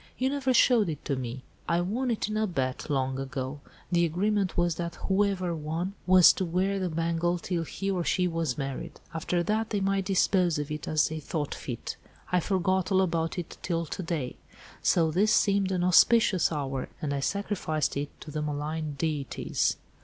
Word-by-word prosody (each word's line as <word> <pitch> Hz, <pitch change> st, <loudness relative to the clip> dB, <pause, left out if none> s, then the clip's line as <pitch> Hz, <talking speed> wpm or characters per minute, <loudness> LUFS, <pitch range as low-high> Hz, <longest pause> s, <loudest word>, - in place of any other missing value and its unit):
You 260 Hz, +1 st, +1 dB
never 275 Hz, -2 st, 0 dB
showed 235 Hz, -5 st, +5 dB
it 150 Hz, -2 st, -6 dB
to 140 Hz, -, 0 dB
me." 130 Hz, 0 st, -5 dB, 0.3 s
"I 170 Hz, 0 st, +3 dB
won 225 Hz, +9 st, -1 dB
it 225 Hz, -3 st, 0 dB
in 215 Hz, -, -3 dB
a 215 Hz, 0 st, +1 dB
bet, 135 Hz, -6 st, -2 dB
long 135 Hz, -2 st, 0 dB
ago. 135 Hz, +1 st, -4 dB, 0.3 s
The 170 Hz, -1 st, +3 dB
agreement 190 Hz, +4 st, 0 dB
was 175 Hz, -1 st, +2 dB
that 170 Hz, +1 st, -4 dB
whoever 190 Hz, -3 st, 0 dB
won 165 Hz, +5 st, -3 dB
was 185 Hz, -1 st, +8 dB
to -, -, -2 dB
wear 185 Hz, +3 st, 0 dB
the 185 Hz, -1 st, -1 dB
bangle 165 Hz, +2 st, 0 dB
till 175 Hz, 0 st, -2 dB
he 195 Hz, +4 st, -3 dB
or 180 Hz, -2 st, 0 dB
she 180 Hz, +1 st, +1 dB
was 165 Hz, -6 st, -1 dB
married. 135 Hz, -2 st, -5 dB
After 175 Hz, +2 st, 0 dB
that, 220 Hz, +3 st, 0 dB
they 205 Hz, -, 0 dB
might 195 Hz, 0 st, 0 dB
dispose 185 Hz, -3 st, +2 dB
of 150 Hz, 0 st, -4 dB
it 150 Hz, -, -5 dB
as 155 Hz, -2 st, +2 dB
they 160 Hz, 0 st, -4 dB
thought 150 Hz, -1 st, -3 dB
fit. 120 Hz, -4 st, -6 dB, 0.3 s
I 180 Hz, -, +4 dB
forgot 185 Hz, +1 st, 0 dB
all 190 Hz, 0 st, +4 dB
about 165 Hz, -2 st, -1 dB
it 175 Hz, -2 st, -6 dB
till 170 Hz, -2 st, -1 dB
to 165 Hz, -, -5 dB
day. 160 Hz, -7 st, -3 dB, 0.4 s
So 165 Hz, -2 st, +3 dB
this 200 Hz, +6 st, +3 dB
seemed 200 Hz, -3 st, +3 dB
an 180 Hz, -2 st, 0 dB
auspicious 185 Hz, 0 st, +5 dB
hour, 135 Hz, -4 st, -3 dB
and 145 Hz, -2 st, -2 dB
I 140 Hz, -, -1 dB
sacrificed 180 Hz, -3 st, -1 dB
it 145 Hz, +1 st, -2 dB
to 150 Hz, -, -8 dB
the 155 Hz, 0 st, -3 dB
malign 150 Hz, +1 st, -3 dB
deities." 150 Hz, -4 st, -1 dB
170 Hz, 190 wpm, -28 LUFS, 150-190 Hz, 0.4 s, was